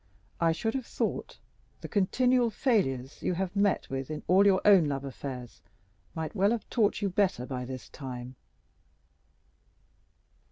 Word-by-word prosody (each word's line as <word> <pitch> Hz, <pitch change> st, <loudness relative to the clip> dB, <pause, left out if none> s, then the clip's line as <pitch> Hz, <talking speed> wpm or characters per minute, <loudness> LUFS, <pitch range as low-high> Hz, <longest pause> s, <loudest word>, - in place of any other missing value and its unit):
I 165 Hz, -1 st, +3 dB
should 225 Hz, +7 st, -1 dB
have 260 Hz, -3 st, -3 dB
thought -, -, -3 dB, 0.4 s
the -, -, -6 dB
continual 245 Hz, +4 st, +2 dB
failures 155 Hz, -, 0 dB
you 180 Hz, -, 0 dB
have 185 Hz, +1 st, -3 dB
met 200 Hz, -1 st, +2 dB
with 135 Hz, 0 st, -3 dB
in 155 Hz, -1 st, -5 dB
all 190 Hz, +3 st, +5 dB
your 190 Hz, -2 st, +5 dB
own 195 Hz, -5 st, +7 dB
love 140 Hz, -1 st, -3 dB
affairs 130 Hz, -2 st, -7 dB, 0.5 s
might 160 Hz, -1 st, -4 dB
have 210 Hz, +3 st, +1 dB
taught 215 Hz, -3 st, +1 dB
you 200 Hz, -, +1 dB
better 185 Hz, -9 st, +1 dB
by 125 Hz, -1 st, -4 dB
this 130 Hz, 0 st, -7 dB
time." 125 Hz, -2 st, -8 dB
180 Hz, 145 wpm, -29 LUFS, 135-205 Hz, 0.5 s, own